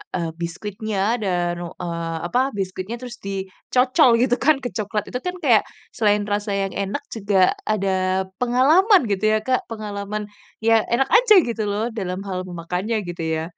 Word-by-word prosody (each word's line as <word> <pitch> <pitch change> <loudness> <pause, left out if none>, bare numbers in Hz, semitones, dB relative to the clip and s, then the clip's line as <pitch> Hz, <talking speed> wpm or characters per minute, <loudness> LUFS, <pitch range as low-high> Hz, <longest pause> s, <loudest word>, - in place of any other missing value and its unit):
eee, 170 -2 -1
biskuitnya 200 +5 -4 0.3
dan 175 -3 0 0.3
eee, 170 -1 -3
apa, 245 - +1 0.2
biskuitnya 190 +3 -4
terus 245 -2 -8
dicocol 200 +7 +1
gitu 245 -1 +3
kan, 310 +1 +6
ke 245 - -2
coklat. 210 -1 -2
Itu 250 - -3
kan, 360 0 -2
kayak, - - +5 0.3
selain 210 -2 +3
rasa 205 0 -2
yang 195 -1 -3
enak 200 +9 -3
juga 200 -2 0 0.3
ada 195 -2 0 0.5
pengalaman 305 - +5
gitu 200 +1 -1
ya, 215 - +4
Kak, 255 -1 +3
pengalaman, 210 -1 -4 0.4
ya 230 - +5 0.2
enak 265 +3 +2
aja, 470 -2 +5
gitu 230 -2 -3
loh, 205 +2 -1
dalam 185 -2 -3
hal 185 -2 -3
memakannya, 180 +5 -3
gitu 175 -1 -5
ya. 160 - -2
205 Hz, 160 wpm, -22 LUFS, 185-240 Hz, 0.5 s, kan